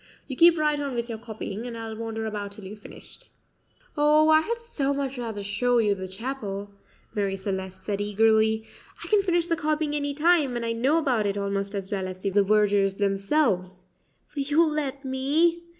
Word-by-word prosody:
You 265 - -5
keep 335 +3 +6
right 300 -1 +1
on 280 -3 -3
with 235 0 -3
your 225 -1 -5
copying, 220 0 -6
and 235 -1 -6
I'll 225 -1 -6
wander 225 0 -4
about 205 -2 -4
till 205 - -12
you've 210 +2 -9
finished." - - -13 0.7
"Oh, 300 +1 +4
I 315 0 +6
had 465 +8 -2
so 290 -13 -2
much 275 -2 -3
rather 220 -4 -4
show 245 +5 +1
you 210 -3 +3
the 190 -1 -6
chapel," 205 -1 -5 0.4
Marie 200 -2 -1
Celeste 190 -1 -5
said 200 0 -2
eagerly. 220 +1 +2 0.4
"I - - -6
can 420 -2 +4
finish 350 -3 +1
the 335 -1 +1
copying 305 -1 -1
any 285 -1 -2
time, 305 -4 +3
and 235 -1 -2
I 230 - -1
know 255 +7 +2
about 250 -10 +1
it 200 0 -2
almost 200 0 -2
as 195 -1 -5
well 190 -2 -2
as 185 0 -7
the 195 - -1
vergers 200 -1 +2
themselves 195 -2 0 0.5
will 285 - -1
you 295 +4 +3
let 290 -3 -2
me?" 310 +6 +1
230 Hz, 195 wpm, -26 LUFS, 200-295 Hz, 0.7 s, keep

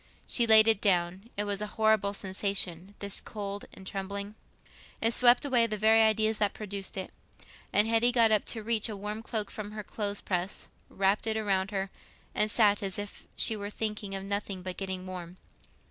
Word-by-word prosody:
She 235 -2 +2
laid 220 0 +8
it 220 -3 +3
down. 185 +2 +1
It 205 - +1
was 205 -1 -2
a 210 - -2
horrible 220 -2 +2
sensation—this 195 0 -2
cold 205 -2 -6
and 190 - -13
trembling. 200 +1 -4 0.7
It 225 +1 +2
swept 245 +3 +5
away 245 -4 +3
the 215 -1 -3
very 220 +2 +5
ideas 220 0 +2
that 205 -2 +1
produced 200 -2 -5
it, 190 - -5 0.6
and 210 +2 +4
Hetty 230 +2 +3
got 230 -2 +4
up 215 -2 +3
to 225 -2 -3
reach 225 0 +1
a 210 - -5
warm 210 +2 -5
cloak 220 -3 -2
from 210 -1 -7
her 215 -1 -6
clothes 205 -1 -2
press, 180 +1 -3 0.2
wrapped 195 +3 +1
it 220 0 0
round 195 -2 0
her, 195 -1 -3 0.4
and 215 - +1
sat 205 -2 +3
as 195 -2 -2
if 205 0 -7
she 225 - +4
were 205 -1 -5
thinking 210 -2 -3
of 195 - -4
nothing 200 -1 -3
but 185 0 -4
getting 190 -1 -4
warm. 180 -1 -8
205 Hz, 190 wpm, -29 LUFS, 195-220 Hz, 0.7 s, laid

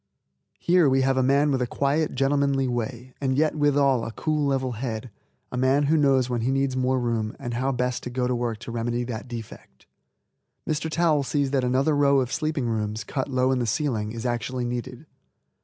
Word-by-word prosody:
Here 175 -4 +3
we 135 0 +3
have 135 0 +2
a 130 - +2
man 140 +3 +3
with 130 -2 0
a 125 - 0
quiet, 145 +4 0
gentlemanly 135 0 +1
way, 125 +1 -4
and 130 -1 0
yet 155 +1 +2
withal 140 -4 +2
a 115 - -4
cool, 150 +4 -1
level 130 -2 0
head, 115 -1 -5 0.4
a 125 - -4
man 130 +3 +3
who 150 +3 +2
knows 135 -4 +3
when 120 -2 -2
he 120 - 0
needs 135 -1 0
more 130 0 +1
room 115 -3 -1
and 120 -3 -5
how 130 +3 0
best 125 -1 -1
to - - -6
go 125 0 -1
to 125 - 0
work 120 -2 -2
to 115 - -7
remedy 120 +1 -1
that 120 0 -6
defect. 110 - -10 0.8
Mr. 155 +1 -1
Towel 160 -2 +2
sees 140 0 -1
that 135 -2 +1
another 130 +4 +2
row 140 -1 +4
of 130 -1 -2
sleeping 155 -4 -1
rooms, 110 -1 -2
cut 130 +6 -3
low 130 0 +2
in 130 - +1
the 120 - -1
ceiling, 110 -4 -1
is 115 +1 -6
actually 120 +1 -2
needed. 125 +3 -5
130 Hz, 205 wpm, -25 LUFS, 120-140 Hz, 0.8 s, row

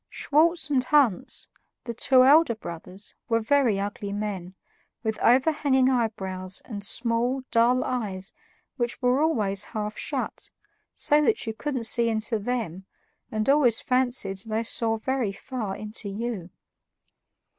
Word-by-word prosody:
Schwartz 320 +1 +1
and 260 -3 +3
Hans, 260 -9 +1 0.4
the 235 - -5
two 255 +2 +4
elder 290 -3 +5
brothers, 180 0 -8 0.2
were 230 -1 +3
very 230 -3 +2
ugly 200 0 -4
men, 200 -3 -4 0.5
with 220 -1 -2
overhanging 265 0 +3
eyebrows 190 -6 -1
and 205 -4 -6
small, 235 +4 +1
dull 240 +2 +3
eyes 200 -6 -3 0.4
which 240 -2 -2
were 250 +3 +3
always 210 -11 +2
half 210 0 -5
shut, - - -3 0.5
so 295 +1 +4
that 435 +7 +1
you 225 - -3
couldn't 260 +1 -3
see 230 +1 +3
into 220 0 0
THEM 200 -5 -4 0.4
and 215 0 -2
always 270 -5 +4
fancied 245 -7 0
they 220 +2 -2
saw 225 0 0
very 250 -2 -1
far 215 -1 -5
into 215 -1 -5
YOU. 205 -3 -4
230 Hz, 135 wpm, -26 LUFS, 205-255 Hz, 0.5 s, elder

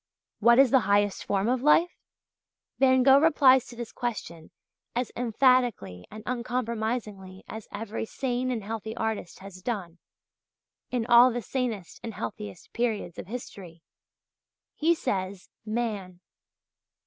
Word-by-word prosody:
What 235 0 +5
is 270 -3 +6
the 265 - +6
highest 205 -1 +2
form 200 +1 0
of 250 0 +1
life? 330 +5 +4 0.9
Van 260 -1 +5
Gogh 270 +1 +7
replies 270 -5 +5
to 240 - -11
this 235 -1 -7
question 170 -9 -5 0.5
as 245 0 -1
emphatically 240 - +1
and 215 +1 -10
uncompromisingly 230 -5 -3
as 220 -1 -8
every 220 +2 -4
sane 255 0 -2
and 235 -4 -2
healthy 220 +1 -5
artist 220 -6 -3
has 190 -1 -11
done 185 -6 -4 0.9
in 245 -3 -1
all 240 +1 +7
the 240 0 -4
sanest 230 -7 -3
and 225 -2 -7
healthiest 105 -3 -7
periods 220 -7 -2
of - - -7
history. 190 -7 -9 0.9
He 335 +2 +2
says 190 - -3 0.2
"Man." 210 -6 -3
225 Hz, 130 wpm, -27 LUFS, 195-250 Hz, 0.9 s, Gogh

